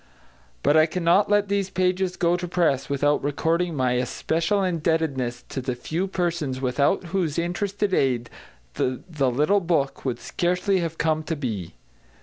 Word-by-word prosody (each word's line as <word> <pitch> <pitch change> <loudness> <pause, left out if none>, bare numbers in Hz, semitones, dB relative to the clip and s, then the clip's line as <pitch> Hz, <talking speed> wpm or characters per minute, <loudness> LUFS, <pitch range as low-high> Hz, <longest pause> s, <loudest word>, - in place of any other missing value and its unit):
But 145 - +4
I 155 0 +6
cannot 175 +4 +2
let 205 0 +3
these 200 -1 0
pages 185 0 0
go 175 0 +2
to 180 0 -3
press 165 -7 +1
without 145 +1 +1
recording 165 +4 0
my 130 -2 +1
especial 160 - 0
indebtedness 160 -8 -1
to 135 - -4
the 125 0 -3
few 165 +9 -2
persons 170 -8 -2
without 135 +8 +1
whose 175 -6 0
interested 195 +4 -1
aid 125 -6 +1 0.5
the 130 - -1 0.3
little 150 +11 +2
book 165 -6 -1
would 125 -3 -2
scarcely 180 +2 0
have 165 -2 -3
come 155 -1 +1
to 165 - -2
be. 110 - -4
165 Hz, 150 wpm, -24 LUFS, 135-180 Hz, 0.5 s, I